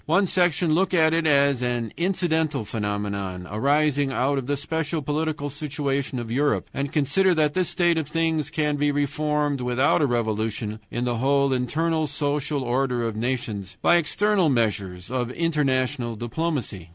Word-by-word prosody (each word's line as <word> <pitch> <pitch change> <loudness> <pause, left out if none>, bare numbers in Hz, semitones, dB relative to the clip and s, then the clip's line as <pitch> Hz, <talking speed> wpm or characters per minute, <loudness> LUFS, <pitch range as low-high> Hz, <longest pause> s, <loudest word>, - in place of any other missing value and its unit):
One 180 +6 +3
section 175 -3 +2
look 185 +3 +2
at 160 -1 +4
it 165 -1 +1
as 140 -3 +3
an 120 -3 -2
incidental 160 - 0
phenomenon, 100 -4 -3
arising 140 +4 +2
out 135 +2 +1
of 130 - -7
the 145 0 0
special 160 +2 -2
political 150 0 -2
situation 140 -2 -2
of 115 -2 -5
Europe, 145 +4 +1
and 140 0 -3
consider 165 +6 +2
that 150 -2 +2
this 185 -2 0
state 175 -2 +2
of 155 - -4
things 160 -1 0
can 150 -2 0
be 145 0 +2
reformed 145 -1 0
without 125 +6 +2
a 145 - +3
revolution 110 -2 -2
in 120 +1 -2
the 120 -1 -1
whole 140 +2 +2
internal 155 +5 0
social 145 0 -1
order 125 0 0
of 115 -2 -2
nations, 110 -5 -3
by 175 - +6
external 190 +2 +2
measures 100 -6 -1
of 125 -2 -1
international 130 -6 0
diplomacy. 120 - -3
140 Hz, 160 wpm, -24 LUFS, 120-155 Hz, -, by